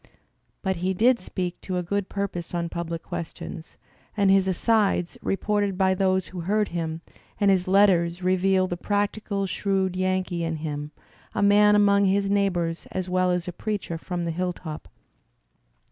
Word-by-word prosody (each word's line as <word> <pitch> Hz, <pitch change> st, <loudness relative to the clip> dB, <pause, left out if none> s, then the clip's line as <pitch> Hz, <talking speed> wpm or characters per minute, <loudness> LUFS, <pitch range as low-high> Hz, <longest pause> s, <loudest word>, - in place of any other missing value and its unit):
But 190 Hz, -3 st, 0 dB
he 185 Hz, +2 st, -1 dB
did 235 Hz, +5 st, +4 dB
speak 180 Hz, -1 st, -4 dB
to 185 Hz, -1 st, -2 dB
good 200 Hz, +2 st, -2 dB
purpose 185 Hz, -4 st, -4 dB
on 170 Hz, -1 st, -1 dB
public 170 Hz, -1 st, -4 dB
questions; 165 Hz, 0 st, -7 dB, 0.4 s
and 200 Hz, -2 st, +4 dB
his 195 Hz, -1 st, +4 dB
asides, 195 Hz, -2 st, +1 dB
reported 205 Hz, -1 st, 0 dB
by 190 Hz, -1 st, +3 dB
those 190 Hz, -1 st, +1 dB
who 185 Hz, -, -7 dB
heard 205 Hz, +5 st, 0 dB
him, 165 Hz, -1 st, -3 dB, 0.4 s
and 200 Hz, -1 st, +4 dB
his 185 Hz, -1 st, +1 dB
letters 185 Hz, -3 st, +3 dB
reveal 185 Hz, +1 st, +3 dB
the 175 Hz, -1 st, -3 dB
practical 205 Hz, +1 st, -1 dB
shrewd 190 Hz, -1 st, -1 dB
Yankee 185 Hz, -2 st, -1 dB
in 165 Hz, -1 st, -1 dB
him, 150 Hz, -1 st, -4 dB, 0.5 s
a -, -, +1 dB
man 210 Hz, +1 st, +6 dB
among 200 Hz, -1 st, +4 dB
his 195 Hz, +1 st, +2 dB
neighbours 175 Hz, -5 st, 0 dB
as 185 Hz, -1 st, -3 dB
well 185 Hz, 0 st, +2 dB
as 180 Hz, -1 st, -1 dB
a 180 Hz, -, -4 dB
preacher 200 Hz, -5 st, -4 dB
from 175 Hz, 0 st, -4 dB
the 165 Hz, -, -1 dB
hilltop. 175 Hz, -2 st, -4 dB
185 Hz, 160 wpm, -25 LUFS, 175-200 Hz, 0.5 s, man